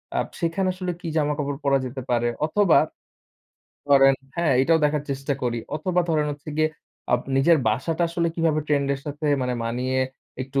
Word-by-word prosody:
আ -, -, +1 dB, 0.2 s
সেখানে 175 Hz, +3 st, 0 dB
আসলে 180 Hz, -1 st, -3 dB
কি 175 Hz, -, -6 dB
জামাকাপড় 145 Hz, -2 st, -1 dB
পরা 140 Hz, -1 st, +4 dB
যেতে 130 Hz, +1 st, -5 dB
পারে 120 Hz, 0 st, +2 dB, 0.2 s
অথবা 185 Hz, +2 st, +4 dB, 1.1 s
ধরেন 135 Hz, -1 st, +6 dB, 0.2 s
হ্যা, 170 Hz, 0 st, 0 dB, 0.2 s
এটাও 160 Hz, +4 st, +4 dB
দেখার 150 Hz, -1 st, +1 dB
চেষ্টা 135 Hz, +1 st, -2 dB
করি। 120 Hz, -1 st, 0 dB, 0.2 s
অথবা 180 Hz, +3 st, 0 dB
ধরেন 155 Hz, -2 st, +2 dB
হচ্ছে 145 Hz, +1 st, -11 dB
গিয়ে 155 Hz, 0 st, +3 dB, 0.4 s
আব 125 Hz, -, +3 dB, 0.2 s
নিজের 160 Hz, +4 st, +5 dB
বাসাটা 155 Hz, +10 st, -1 dB
আসলে 170 Hz, 0 st, 0 dB
কিভাবে 165 Hz, -2 st, +1 dB
ট্রেন্ড 140 Hz, -2 st, +1 dB
এর 135 Hz, -, -8 dB
সাথে 150 Hz, +1 st, -4 dB, 0.2 s
মানে 125 Hz, 0 st, -1 dB
মানিয়ে 125 Hz, +3 st, -1 dB, 0.4 s
একটু 135 Hz, +1 st, -2 dB
145 Hz, 170 wpm, -24 LUFS, 135-165 Hz, 1.1 s, ধরেন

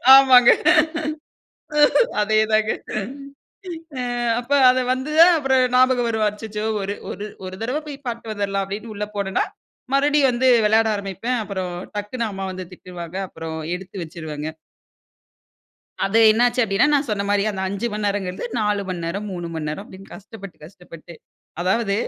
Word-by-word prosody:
ஆமாங்க. 255 Hz, -3 st, +7 dB, 1.7 s
அதேதாங்க. 215 Hz, 0 st, +2 dB, 1.3 s
அ -, -, -2 dB, 0.4 s
அப்ப 245 Hz, +3 st, -7 dB, 0.2 s
அத 255 Hz, -, +1 dB
வந்து 260 Hz, +3 st, -3 dB
தான் 345 Hz, +1 st, +8 dB
அப்புறம் 265 Hz, -3 st, +2 dB
ஞாபகம் 255 Hz, -1 st, +4 dB
வரும். 220 Hz, -1 st, 0 dB
அச்சச்சோ 210 Hz, 0 st, -6 dB, 0.2 s
'ஒரு 200 Hz, +1 st, -3 dB, 0.2 s
ஒரு 205 Hz, -, -6 dB, 0.2 s
ஒரு 185 Hz, -, -7 dB
தடவ 260 Hz, +7 st, -2 dB
போய் 280 Hz, -1 st, -9 dB
பார்த்துட்டு 230 Hz, -2 st, -4 dB
வந்துட்லாம்' 200 Hz, -1 st, -1 dB
அப்டின்னு 210 Hz, +3 st, -6 dB
உள்ள 210 Hz, +1 st, -3 dB
போனன்னா. 195 Hz, -1 st, 0 dB, 0.5 s
மறுபடியும் 285 Hz, 0 st, +3 dB
வந்து 250 Hz, +2 st, +1 dB, 0.2 s
விளையாட 220 Hz, +1 st, +3 dB
ஆரம்பிப்பேன். 200 Hz, +5 st, -3 dB
அப்புறம் 190 Hz, -3 st, -4 dB, 0.2 s
டக்குனு 220 Hz, +3 st, -3 dB
அம்மா 195 Hz, -1 st, -5 dB
வந்து 185 Hz, 0 st, -6 dB
திட்டுவாங்க. 180 Hz, -1 st, -9 dB
அப்புறம் 160 Hz, -2 st, -7 dB, 0.2 s
எடுத்து 190 Hz, +1 st, -9 dB
வச்சுருவங்க. 155 Hz, -2 st, -6 dB, 1.5 s
அது 195 Hz, +3 st, +2 dB
என்ன 225 Hz, +2 st, +1 dB
ஆச்சு 245 Hz, +1 st, 0 dB
அப்டின்னா. 195 Hz, +5 st, +2 dB
நான் 285 Hz, 0 st, +1 dB
சொன்ன 200 Hz, -1 st, -1 dB
மாரி 205 Hz, -1 st, +2 dB
அந்த 195 Hz, -2 st, -5 dB
5 200 Hz, +4 st, -3 dB
மணி 210 Hz, 0 st, -3 dB
நேரம்ங்குறது 195 Hz, -2 st, -2 dB
4 210 Hz, -2 st, 0 dB
மணி 175 Hz, -2 st, -4 dB
நேரம், 195 Hz, +5 st, -4 dB
3 175 Hz, -2 st, -5 dB
மணி 155 Hz, -2 st, -3 dB
நேரம் 155 Hz, +7 st, -5 dB
அப்டின்னு 195 Hz, -1 st, -14 dB
கஷ்டப்பட்டு, 200 Hz, -2 st, -11 dB
கஷ்டப்பட்டு. 170 Hz, -2 st, -13 dB, 0.5 s
அதாவது 200 Hz, +3 st, +1 dB
205 Hz, 145 wpm, -21 LUFS, 190-235 Hz, 1.7 s, தான்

